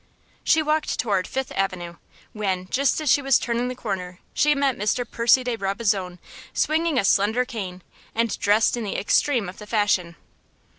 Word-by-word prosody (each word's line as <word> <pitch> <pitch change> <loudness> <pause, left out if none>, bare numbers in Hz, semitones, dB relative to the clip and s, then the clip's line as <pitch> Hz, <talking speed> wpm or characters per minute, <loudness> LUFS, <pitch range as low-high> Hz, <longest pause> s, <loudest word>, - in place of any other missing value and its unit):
She 320 -1 +3
walked 305 0 0
toward 195 -5 0
Fifth 265 0 -3
Avenue, 180 -3 -3 0.4
when, 190 -4 -2
just 275 +3 +1
as 305 -5 +1
she 285 - +4
was 270 -2 +4
turning 240 +1 -1
the 250 - -4
corner, 180 -6 -5 0.2
she 300 0 +3
met 275 -2 +1
Mr. 215 +4 -1
Percy 235 +3 +3
de 245 -1 -1
Brabazon, 195 -3 -1 0.4
swinging 315 -1 +1
a 200 - +2
slender 220 +6 +3
cane, 190 -8 -6 0.3
and 230 -1 0
dressed 210 +4 +3
in 240 - -4
the 200 - -3
extreme 235 +1 +2
of 180 - -9
the 210 - -10
fashion. 205 -6 +1
220 Hz, 170 wpm, -24 LUFS, 195-255 Hz, 0.4 s, she